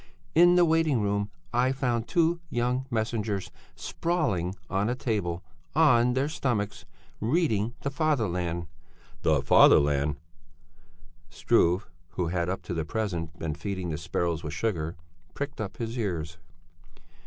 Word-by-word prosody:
In 175 +2 +6
the 175 -1 +6
waiting 160 -5 +2
room 100 0 0 0.2
I 125 +2 +3
found 120 -4 -1
two 170 -1 +2
young 125 +2 -1
messengers 110 -4 -2 0.2
sprawling 110 - -1
on 100 +2 0
a 125 - 0
table, 100 -8 -2 0.3
on 125 -6 +5
their 135 +3 +1
stomachs, 120 -9 -2 0.3
reading 115 - +1
the 140 - -2
Fatherland." 90 - 0 0.6
"The - - +2
'Fatherland'?" 70 0 +5 1.1
Struve, 90 +4 +2 0.3
who 90 -2 -1
had 85 0 -1
up 95 - -3
to 90 - -5
the 80 -2 -1
present 85 -4 -3
been 80 -2 -3
feeding 95 +2 -4
the 75 - -2
sparrows 85 -1 -1
with 75 -2 -4
sugar, 85 -5 -2 0.4
pricked 140 -3 -4
up 100 - -5
his 115 0 -4
ears. 85 -8 -3
105 Hz, 130 wpm, -27 LUFS, 85-130 Hz, 1.1 s, In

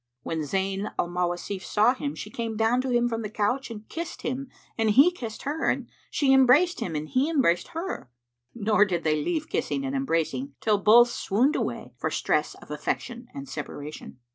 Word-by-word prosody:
When 165 - -3
Zayn 195 +6 -1
al 175 - 0
Mawasif 180 +2 -2
saw 215 +5 +3
him, 285 +2 -4
she 210 - -7
came 225 -1 -3
down 225 +3 +3
to 260 - -3
him 240 -1 +3
from 230 -1 -2
the 210 - -4
couch 215 +6 -1
and 215 -2 -9
kissed 335 0 -6
him 260 +2 -3 0.3
and 225 -1 +1
he 275 +11 +6
kissed 230 -11 -7
her 300 +3 0
and - - -1 0.2
she 270 -2 +3
embraced 280 +8 +5
him 165 - -3
and 150 +1 -3
he 260 - +1
embraced 260 - +2
her; 335 - -4 0.5
nor 210 -2 +3
did 175 -5 -1
they 155 -1 +1
leave 315 - -1
kissing 275 -3 -2
and 270 0 -2
embracing 265 - -1
till 210 -2 +2
both 235 +4 +6
swooned 245 +11 +1
away - - -3
for - - -1
stress - - 0
of - - -14
affection 240 0 -3
and 140 0 -6
separation. 150 -2 -7
230 Hz, 190 wpm, -26 LUFS, 190-270 Hz, 0.5 s, he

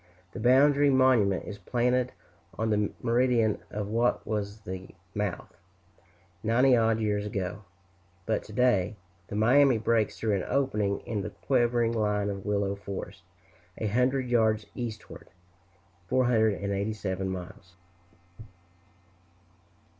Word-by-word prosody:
The - - -8
boundary 140 +4 +5
monument 130 -8 +3
is 105 -1 -8
planted 125 +5 0 0.5
on 110 0 0
the 105 -1 +1
meridian 120 -2 +2
of 105 -1 -4
what 115 +3 0
was 105 0 -3
the 95 -1 -8 0.2
mouth, 105 -4 -4 0.9
ninety 125 +4 +4
odd 115 -1 +2
years 105 -2 0
ago; 100 -1 -4 0.6
but 110 - 0
to - - -12
day 110 -4 +2 0.3
the - - -6
Miami 125 +4 +5
breaks 110 -1 0
through 105 -3 0
an 95 - -3
opening 105 -8 0
in 105 -3 -3
the - - -4
quivering 120 -3 +1
line 105 -2 0
of 100 -1 -7
willow 100 -1 0
forest, 100 -1 -7 0.6
a - - -3
hundred 125 +4 +1
yards 110 -3 +2
eastward 115 -3 -7 0.8
(487 100 -4 0
miles). 90 -1 -8
110 Hz, 115 wpm, -28 LUFS, 100-120 Hz, 0.9 s, boundary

